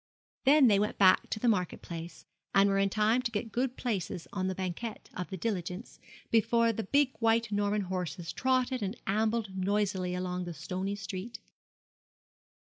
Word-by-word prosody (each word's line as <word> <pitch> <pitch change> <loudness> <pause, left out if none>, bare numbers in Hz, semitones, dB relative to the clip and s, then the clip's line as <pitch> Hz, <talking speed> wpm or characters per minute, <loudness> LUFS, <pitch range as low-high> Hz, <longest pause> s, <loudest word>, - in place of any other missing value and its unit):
Then 285 +1 +7
they 205 -3 +5
went 210 +1 -1
back 185 -2 +5
to 215 - -2
the 245 - 0
Market 185 -6 0
Place, 170 0 -8 0.3
and 195 0 +6
were 195 0 +2
in 195 0 +3
time 215 +4 +2
to 245 - -1
get 225 0 -3
good 250 +3 -1
places 195 -7 -3
on 185 -1 -1
the 190 - -2
banquette 190 +5 -5
of 180 - -5
the 190 - -5
diligence, 185 +1 -4 0.3
before 230 +1 +3
the 225 -1 -4
big 280 +4 +3
white 230 -1 +2
Norman 205 0 +1
horses 180 -2 -4
trotted 255 -1 +1
and 200 +3 -3
ambled 215 0 0
noisily 190 -1 0
along 180 0 -3
the 175 -1 -6
stony 190 +5 -3
street. 200 +3 -6
205 Hz, 170 wpm, -30 LUFS, 185-230 Hz, 0.3 s, Then